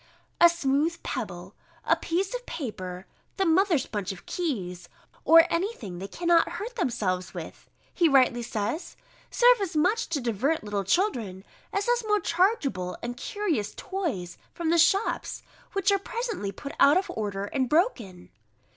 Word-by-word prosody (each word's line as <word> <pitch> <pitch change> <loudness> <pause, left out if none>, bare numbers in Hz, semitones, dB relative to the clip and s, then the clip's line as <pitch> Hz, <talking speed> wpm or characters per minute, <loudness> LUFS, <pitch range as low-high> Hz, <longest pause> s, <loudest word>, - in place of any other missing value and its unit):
"A 345 - +8
smooth 315 0 0
pebble, - - -5 0.3
a - - +4
piece 375 +6 -2
of - - -5
paper, 185 - -6 0.3
the 385 - +2
mother's 340 -4 +3
bunch 205 -3 -4
of 190 - -10
keys, 195 - -4 0.4
or 330 0 +8
any 370 +6 +1
thing 190 - -8
they 195 - -5
cannot 340 - +2
hurt 475 +4 -6
themselves 200 - -2
with," - - -9 0.2
he 340 -3 +3
rightly 255 -3 +4
says, 230 - -4 0.3
"serve - - +5
as 375 -5 -3
much 370 +9 +2
to 325 -3 -1
divert 250 +6 0
little 205 -1 -2
children, 205 - 0 0.3
as 400 +1 -1
those 485 0 +1
more 420 0 +3
chargeable 310 - 0
and 240 +1 -4
curious 295 - -2
toys 275 - -4 0.2
from 335 -2 -1
the 340 - +4
shops, 390 +6 +1 0.3
which 395 0 +2
are 395 - +3
presently 445 - -4
put 280 +7 -8
out 285 +4 +6
of 380 - -1
order, 200 -2 -3
and 260 +3 -1
broken." 240 - 0
305 Hz, 155 wpm, -27 LUFS, -, 0.4 s, A